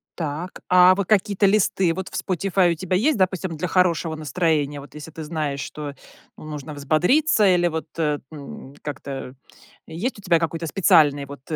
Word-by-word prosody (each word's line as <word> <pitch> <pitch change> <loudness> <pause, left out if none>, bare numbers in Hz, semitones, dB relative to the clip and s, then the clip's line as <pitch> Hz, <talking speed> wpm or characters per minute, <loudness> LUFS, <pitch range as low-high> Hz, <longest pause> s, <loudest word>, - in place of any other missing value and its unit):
Так, 160 +2 -5
а 180 0 +6
вот 195 -2 -2
какие-то 205 -1 +2
листы 190 -3 +2
вот 190 +1 -5
в - - -24
Spotify 185 -1 +1
у - - -7
тебя 185 +3 -2
есть, 275 +7 +2
допустим, 185 -3 0
для 170 +4 -3
хорошего 170 -3 +1
настроения? 155 -2 -1
Вот 140 - -14
если 150 +1 -9
ты 160 0 -8
знаешь, 150 -3 -3
что, 145 -2 -6 0.4
ну, - - -12
нужно 150 -1 -7
взбодриться 180 - +2
или 175 -2 +3
вот, 160 -1 -4
э, 150 -3 0
ну, 140 -2 -10
как-то 135 -2 -6 0.5
есть 200 +9 -4
у - - -12
тебя 175 -4 +2
какой-то 165 0 -3
специальный 155 -5 +4
вот 140 -1 -11
165 Hz, 175 wpm, -23 LUFS, 150-185 Hz, 0.5 s, а